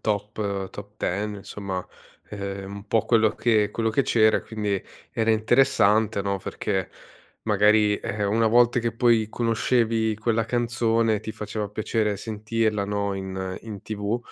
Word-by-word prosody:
Top 105 0 -2 0.3
Top 100 +1 -10
10 105 +3 -2
insomma, 95 -2 -5 0.4
ehm, 100 -1 -5
un 100 +1 -10
po' 115 - +1
quello 110 -2 +3
che 110 -2 +2
quello 115 0 0
che 110 - +2
c'era 110 -4 +4
e - - -10
quindi 105 -3 -2 0.3
era 115 0 +1
interessante, 110 -2 +3
no, 100 0 -1
perché 95 0 -3 0.5
magari, 105 0 +4
ehm, 105 -2 -2
una 115 +1 +3
volta 120 +2 +4
che 115 -1 -1
poi 115 -3 +3
conoscevi 115 -1 +1
quella 110 0 0
canzone 115 -2 +1
ti 110 - -6
faceva 105 -1 -4
piacere 105 0 -1
sentirla, 110 0 -1
no, 100 -1 -1
in 95 -1 -4
in 105 -4 -8
TV 105 +2 -2
110 Hz, 145 wpm, -25 LUFS, 100-115 Hz, 0.5 s, c'era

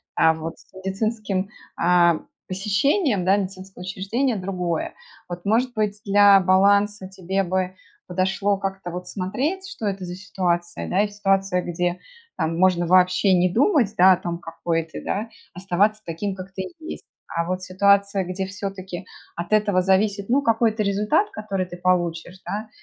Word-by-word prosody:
А 160 0 +5
вот 160 +1 -7
с - - -23
медицинским, 195 0 -2 0.3
а, 170 -1 +4 0.3
посещением, 205 - +1
да, 195 +2 +4
медицинского 190 -1 -6
учреждения 210 +8 -1
другое. 180 -4 -3 0.4
Вот, 175 +1 -7
может 240 +5 +2
быть, 210 -2 -1
для 200 0 +7
баланса 200 +2 +3
тебе 190 +1 -2
бы 185 0 -1 0.3
подошло 190 +2 0
как-то 195 -2 -4
вот 180 +1 -6
смотреть, 270 - -2
что 395 - -7
это 195 -1 -3
за 175 - -6
ситуация, 175 -3 -2
да, 190 - +2
и - - 0
ситуация, 195 -2 +1
где, 175 +1 -2 0.4
там, 165 +1 -1
можно 180 -2 +3
вообще 185 +2 +4
не 180 0 +3
думать, 245 - +3
да, 185 +2 +8
о 185 - +5
том, 170 -1 -4
какой 165 0 -2
ты, 160 - -9
да? 215 +3 -2 0.2
Оставаться 195 +4 +1
таким, 190 +4 -3
какой 190 0 -9
ты 190 - -4 0.2
есть. 315 - -8 0.2
А 170 0 -1
вот 185 +1 -3
ситуация, 200 +1 +2
где 185 +2 -3
все-таки 190 -2 -6 0.3
от 170 +4 -3
этого 205 -3 +3
зависит, 195 +2 +1
ну, 270 +4 +3
какой-то 225 -2 +2
результат, 210 - +1
который 200 - -3
ты 175 0 -10
получишь, 175 0 -1
да, 215 +2 -4
190 Hz, 160 wpm, -23 LUFS, 180-205 Hz, 0.4 s, да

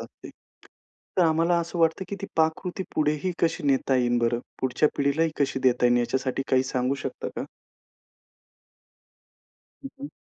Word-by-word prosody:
असते. - - -11 0.9
तर - - +6
आम्हाला 165 +2 +3
असं 170 +1 -5
वाटतं 165 +3 +2
की 200 - -4
ती 200 - -4
पाककृती, 160 +4 0
पुढेही 150 +4 0
कशी 165 - +1
नेता 135 -1 +2
येईल 120 -1 +2
बरं, 120 0 +1 0.2
पुढच्या 130 +4 +2
पिढीलाही 145 +3 +1
कशी 135 -1 +1
देता 125 -1 +4
येईल, 120 0 +4
याच्यासाठी 130 +2 -1
काही 130 -1 +4
सांगू 130 0 -1
शकता - - -4
का? - - -3 2.4
हं, 275 - -5
हं. 285 +1 -6
140 Hz, 145 wpm, -26 LUFS, 130-165 Hz, 2.4 s, तर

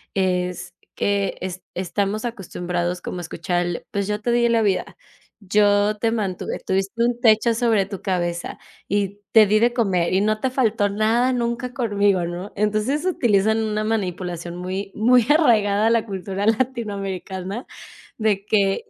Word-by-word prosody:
es 180 -2 -1 0.2
que 200 -1 0
es 185 0 -5
estamos 200 +4 -2
acostumbrados 180 -5 -3
como 180 - -5
a - - -4
escuchar 175 +1 -2
el: 175 -1 -4
"Pues 200 -1 -2
yo 210 0 -1
te 240 +3 -1
di 235 0 +3
la 230 -1 +3
vida, 195 -3 -1 0.4
yo 205 +1 +2
te 230 - +1
mantuve, 200 -5 -2
tuviste 195 +4 0
un 240 0 -1
techo 225 0 +4
sobre 225 -4 +2
tu 195 -1 -7
cabeza 175 -2 -2 0.3
y 200 0 -1
te 220 -1 +7
di 210 +1 +3
de 235 +2 +3
comer 195 -8 +1
y 190 - +3
no 215 +1 +1
te 260 - 0
faltó 225 -5 +1
nada 220 +5 +2
nunca 240 0 -2
conmigo", 205 -7 +1
¿no? 175 +4 -6
Entonces, 215 - 0
utilizan 220 - +2
una 215 0 -1
manipulación 180 -5 -3
muy 185 +2 -4
muy 245 +2 +4
arraigada 220 -9 +4
a - - +4
la 230 -1 +3
cultura 195 0 -4
latinoamericana 205 - -2 0.5
de 210 -3 +1
que, 200 - +1
205 Hz, 160 wpm, -22 LUFS, 190-225 Hz, 0.5 s, te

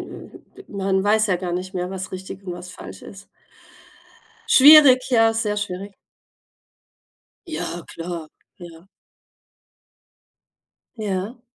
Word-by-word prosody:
m - - -11 0.2
man 195 -1 -1
weiß 215 +1 +3
ja 185 - +2
gar 180 -1 -5
nicht 185 +1 -4
mehr, 180 0 -3
was 190 0 -6
richtig 190 +1 -8
und 180 - -5
was 180 +1 -9
falsch 95 - -11
ist. 200 0 -13 1.2
Schwierig, 275 -2 +7
ja, 225 -3 +3
sehr 215 -2 -2
schwierig. 200 0 -5 1.5
Ja, 245 - -5
klar. 165 -1 -7 0.3
Ja. 170 0 -13 2.1
Ja. 210 +3 -4
190 Hz, 110 wpm, -21 LUFS, 180-220 Hz, 2.1 s, Schwierig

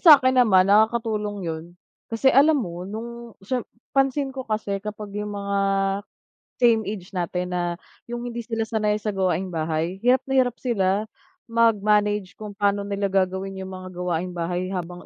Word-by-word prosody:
sa'kin 270 -6 +7
naman 195 -6 +5
nakakatulong 210 -2 +2
'yon 160 -1 -4 0.4
kasi 230 +4 +3
alam 295 +3 +6
mo 180 -6 -4
nung 235 +2 -7
siyem 250 +4 -1 0.3
pansin 270 0 +1
ko 265 - -5
kasi 210 -2 -1
kapag 210 0 -7
yung 210 0 -4
mga 200 0 -1 1.0
same 235 -3 +4
age 195 -3 -7
natin 180 0 -2
na 180 - 0 0.5
yung 240 0 -4
hindi 240 -1 -4
sila 225 -1 -2
sanay 215 -1 0
sa 210 0 -2
gawaing-bahay, 175 -2 -1
hirap 250 +2 +4
na 270 - -3
hirap 245 -2 +1
sila 205 -4 +1 0.4
mag-manage 210 -4 +2
kung 210 -2 -9
paano 200 0 +2
nila 200 0 -2
gagawin 190 0 0
yung 190 - -6
mga 185 0 -8
gawaing-bahay 180 +1 -2
habang 180 0 -5
205 Hz, 150 wpm, -24 LUFS, 185-230 Hz, 1.0 s, sa'kin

